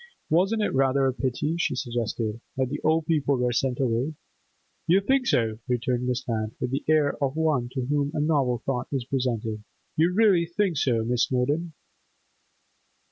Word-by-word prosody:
'Wasn't 195 +7 +2
it - - -1
rather 135 0 +3
a 130 - +1
pity,' 135 +5 -1
she - - 0
suggested, 115 -3 -3 0.2
'that 130 -1 0
the 145 +2 -4
old 160 0 +2
people 145 -4 +1
were 125 0 +1
sent 125 +1 0
away?' 130 +4 0 0.7
'You 180 +4 +5
think 255 +5 +1
so?' 110 -2 +1
returned 125 0 -1
Miss 125 0 -2
Lant, 110 -2 -2
with 125 - -2
the 135 +2 -2
air 150 -2 +2
of 135 +1 0
one 155 -7 +1
to 130 -2 -2
whom 145 +1 0
a - - 0
novel 140 -6 +1
thought 130 -2 -2
is 135 -4 -2
presented. 115 -5 -2 0.3
'You 165 +3 +3
really 190 -4 +4
think 175 -1 0
so, 115 -4 +1
Miss 120 +1 +2
Snowdon? 145 +6 -1
135 Hz, 175 wpm, -26 LUFS, 125-155 Hz, 0.7 s, You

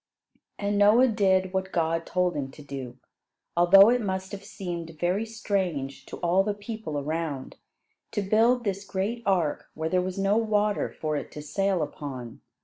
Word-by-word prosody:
And 205 0 0
Noah 225 +5 +6
did 190 -3 +2
what 190 0 -2
God 165 0 0
told 180 0 +1
him 135 -2 -3
to 150 - -12
do, 135 -3 -7 0.6
although 195 +4 +8
it 245 0 +2
must 190 -2 -3
have 200 -1 -7
seemed 170 -5 -6
very 185 +6 0
strange 185 - -2
to - - -7
all 175 +3 +4
the 205 0 -1
people 205 -7 -5
around, 150 -1 -3 0.5
to 205 - -2
build 230 +5 +3
this 200 -2 -2
great 200 +5 -2
ark 175 -6 0
where 160 +1 -2
there 180 +2 +2
was 185 +1 -4
no 195 +2 +2
water 210 -2 +1
for 155 -1 -3
it 140 - -6
to 150 - -7
sail 195 +2 0
upon. 130 -6 -7
190 Hz, 170 wpm, -27 LUFS, 160-205 Hz, 0.6 s, although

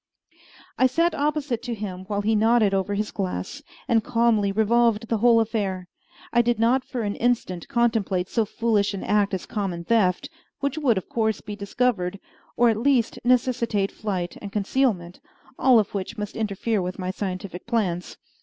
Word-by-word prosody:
I 260 - +6
sat 335 +7 +1
opposite 290 -5 -1
to 245 -1 -4
him 190 -3 -6
while 205 0 -2
he 215 +2 +1
nodded 220 -1 +3
over 195 +1 0
his 210 +1 -2
glass, 185 - -4 0.3
and 225 -2 +3
calmly 230 -4 +2
revolved 225 +1 +2
the 225 - +1
whole 235 0 +5
affair. 200 -5 -2 0.4
I 240 - +5
did 240 0 +1
not 240 +4 +2
for 245 -3 -4
an 205 -1 -1
instant 225 -8 -1
contemplate 220 -6 +1
so 225 - +1
foolish 210 -2 0
an 195 - -5
act 205 -1 +2
as 185 - -5
a - - -13
common 190 -6 -3
theft, 210 +3 +2 0.3
which 280 +2 -2
would 250 -8 +2
of 190 - -4
course 220 -2 0
be 210 -1 -7
discovered, 200 -2 -1 0.4
or 240 0 +5
at 220 - +1
least 245 -1 +1
necessitate 235 -5 +1
flight 185 -5 -3
and 200 - -7
concealment, 200 -4 0 0.4
all 255 -2 +6
of 210 -2 +1
which 195 -2 -4
must 210 -1 -5
interfere 215 0 -1
with 180 0 -4
my 185 -1 -3
scientific 185 -1 -5
plans. 195 -7 -1
215 Hz, 175 wpm, -24 LUFS, 195-235 Hz, 0.4 s, I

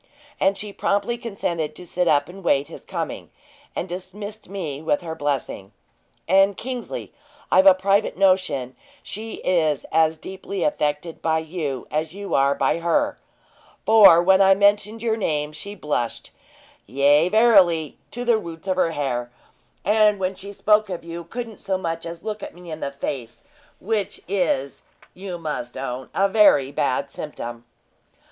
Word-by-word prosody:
And 195 +1 +2
she 205 -1 -4
promptly 205 +5 0
consented 175 -10 -3
to 180 - -10
sit 175 +1 -1
up 145 -2 +3
and 195 +2 -11
wait 140 -2 +2
his - - -10
coming, - - -5 0.5
and 180 - -3
dismissed 205 +4 -7
me 160 -8 -5
with 190 +4 0
her 165 -2 -5
blessing. 140 -9 -3 0.5
And, 195 +2 +4
Kingsley, 250 -1 -5 0.4
I've 190 +1 +6
a 190 - +9
private 195 +2 +1
notion 185 -10 +2 0.3
she 220 +2 -6
is 160 -5 +1
as 160 0 +3
deeply 190 +2 -5
affected 150 +2 -1
by 160 -1 +1
you 160 -5 -4
as 155 +3 -2
you 200 0 -6
are 140 +1 +3
by 165 - +1
her; 290 - 0 0.7
for, 200 -6 +8
when 190 +1 +5
I 195 0 +6
mentioned 205 +2 +2
your 225 -1 +1
name, 150 -7 -1
she 200 +7 -8
blushed, 145 - -3 0.6
yea, 145 - +4
verily 190 - +4
to 245 +1 -6
the 235 -2 +3
roots 170 -1 -9
of 185 -1 0
her 165 -3 +2
hair; 125 -5 -2 0.6
and 210 +1 +4
when 190 0 -1
she 200 +1 -10
spoke 210 +1 +2
of 180 -3 -5
you, 170 0 -7
couldn't 230 +3 -6
so 195 -1 -1
much 165 -2 -4
as 170 0 -8
look 215 -1 -5
me 175 -1 -11
in 155 - -6
the 140 - -3
face 120 -4 -6 0.4
which 205 -1 -2
is, 170 -8 -1 0.3
you 185 -1 -6
must 150 -7 -5
own, 130 -1 -5
a 195 - +3
very 190 -10 +5
bad 140 0 -1
symptom." 120 -6 -7
175 Hz, 160 wpm, -23 LUFS, 150-200 Hz, 0.7 s, a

